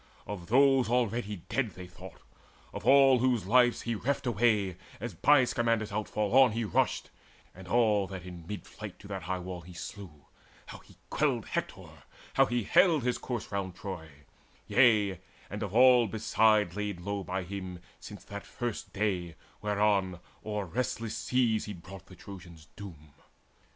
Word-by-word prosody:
Of 90 Hz, -4 st, -7 dB
those 135 Hz, -1 st, +4 dB
already 115 Hz, -6 st, -1 dB
dead 125 Hz, -7 st, -1 dB
They 90 Hz, -, -8 dB
thought 90 Hz, 0 st, -13 dB, 0.5 s
of -, -, -6 dB
all 135 Hz, -2 st, +7 dB
whose 125 Hz, -5 st, +1 dB
lives 120 Hz, +3 st, +3 dB
he 115 Hz, -, -2 dB
reft 135 Hz, +6 st, -2 dB
away 105 Hz, -5 st, +1 dB, 0.2 s
As 120 Hz, -4 st, -5 dB
by 140 Hz, -, +5 dB
Scamander's 115 Hz, -3 st, 0 dB
outfall 105 Hz, +1 st, -2 dB
on 125 Hz, -5 st, +5 dB
he 115 Hz, +1 st, -1 dB
rushed, 105 Hz, -, 0 dB, 0.4 s
And 95 Hz, 0 st, -12 dB
all 105 Hz, -3 st, +2 dB
that 95 Hz, -2 st, -7 dB
in 85 Hz, -2 st, -10 dB
mid 105 Hz, +1 st, -6 dB
flight -, -, -9 dB
to -, -, -13 dB
that -, -, -4 dB
high 90 Hz, +2 st, -3 dB
wall 90 Hz, -1 st, -7 dB
He 90 Hz, +2 st, -13 dB
slew, 85 Hz, -4 st, -9 dB, 0.4 s
how -, -, -10 dB
he -, -, -20 dB
quelled -, -, 0 dB
Hector, -, -, -4 dB, 0.5 s
how -, -, +4 dB
he 120 Hz, -1 st, -1 dB
haled 160 Hz, -, +4 dB
His 125 Hz, 0 st, 0 dB
corse 120 Hz, -4 st, -5 dB
round 95 Hz, -3 st, -3 dB
Troy; 95 Hz, -5 st, -7 dB, 0.6 s
yea, 105 Hz, -7 st, +3 dB, 0.3 s
and 105 Hz, -, -5 dB
of 105 Hz, -, -3 dB
all 125 Hz, -1 st, +6 dB
beside 110 Hz, -3 st, +2 dB
Laid 105 Hz, -4 st, -4 dB
low 100 Hz, +1 st, -3 dB
by 95 Hz, +1 st, -3 dB
him 90 Hz, -1 st, -6 dB, 0.2 s
since 105 Hz, -, -10 dB
that 100 Hz, 0 st, -9 dB
first 120 Hz, -3 st, -5 dB
day 95 Hz, -5 st, -1 dB, 0.3 s
whereon 100 Hz, -3 st, +1 dB, 0.2 s
O'er 105 Hz, -2 st, -3 dB
restless 115 Hz, +2 st, -3 dB
seas 115 Hz, -2 st, +1 dB
he 105 Hz, -, -6 dB
brought 95 Hz, +1 st, -12 dB
the 95 Hz, -, -13 dB
Trojans 85 Hz, -4 st, -12 dB
doom. 80 Hz, -7 st, -11 dB
105 Hz, 165 wpm, -30 LUFS, 95-120 Hz, 0.6 s, all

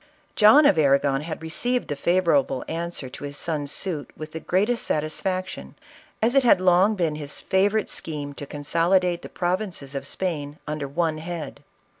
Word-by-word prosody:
John 250 Hz, +8 st, +7 dB
of 185 Hz, -, +5 dB
Arragon 140 Hz, -1 st, +3 dB
had 160 Hz, +1 st, -6 dB
received 245 Hz, +10 st, -1 dB
the 145 Hz, -, -3 dB
favorable 150 Hz, -5 st, +1 dB
answer 170 Hz, -4 st, -4 dB
to 130 Hz, -, -10 dB
his 145 Hz, 0 st, -6 dB
son's 145 Hz, -3 st, -2 dB
suit 165 Hz, -5 st, -3 dB
with 155 Hz, 0 st, -7 dB
the 160 Hz, -, -5 dB
greatest 210 Hz, +9 st, 0 dB
satisfaction, 185 Hz, +5 st, -2 dB, 0.5 s
as 235 Hz, +2 st, +3 dB
it 275 Hz, -, +5 dB
had 230 Hz, -6 st, +5 dB
long 185 Hz, +3 st, +4 dB
been 165 Hz, -5 st, -1 dB
his 145 Hz, -2 st, -5 dB
favorite 200 Hz, +3 st, +1 dB
scheme 145 Hz, -3 st, -4 dB
to 140 Hz, 0 st, -8 dB
consolidate 170 Hz, +5 st, +1 dB
the -, -, -9 dB
prov 180 Hz, +1 st, 0 dB
inces 170 Hz, -10 st, -6 dB
of 140 Hz, -, -5 dB
Spain 150 Hz, -6 st, -3 dB
under 150 Hz, -1 st, -3 dB
one 155 Hz, +2 st, -1 dB
head. 165 Hz, -3 st, -6 dB
165 Hz, 170 wpm, -24 LUFS, 145-185 Hz, 0.5 s, John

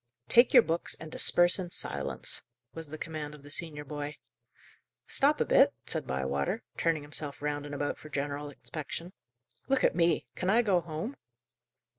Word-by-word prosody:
"Take 240 Hz, +1 st, +6 dB
your -, -, +8 dB
books, 165 Hz, +2 st, -1 dB
and 160 Hz, -1 st, -10 dB
disperse 175 Hz, +3 st, +5 dB
in 180 Hz, -2 st, -4 dB
silence," -, -, -2 dB, 0.3 s
was 165 Hz, -1 st, -6 dB
the 155 Hz, +2 st, -7 dB
command 155 Hz, -2 st, -5 dB
of 145 Hz, -, -16 dB
the 145 Hz, -, -12 dB
senior 150 Hz, -2 st, -3 dB
boy. 145 Hz, 0 st, -5 dB, 0.9 s
"Stop -, -, +2 dB
a -, -, +2 dB
bit," -, -, +5 dB
said -, -, -3 dB
Bywater, 65 Hz, +1 st, -1 dB
turning 160 Hz, -3 st, +1 dB
himself 145 Hz, -1 st, -6 dB
round 145 Hz, 0 st, -2 dB
and 145 Hz, -, -6 dB
about 145 Hz, 0 st, -2 dB
for 155 Hz, -, -11 dB
general 145 Hz, 0 st, -3 dB
inspection. 160 Hz, +5 st, -7 dB, 0.5 s
"Look 270 Hz, -1 st, +2 dB
at -, -, +4 dB
me! 170 Hz, -1 st, +2 dB
Can 180 Hz, -, -2 dB
I 230 Hz, +4 st, +5 dB
go 190 Hz, -5 st, +3 dB
home?" 170 Hz, -, -5 dB
155 Hz, 170 wpm, -30 LUFS, 145-170 Hz, 0.9 s, your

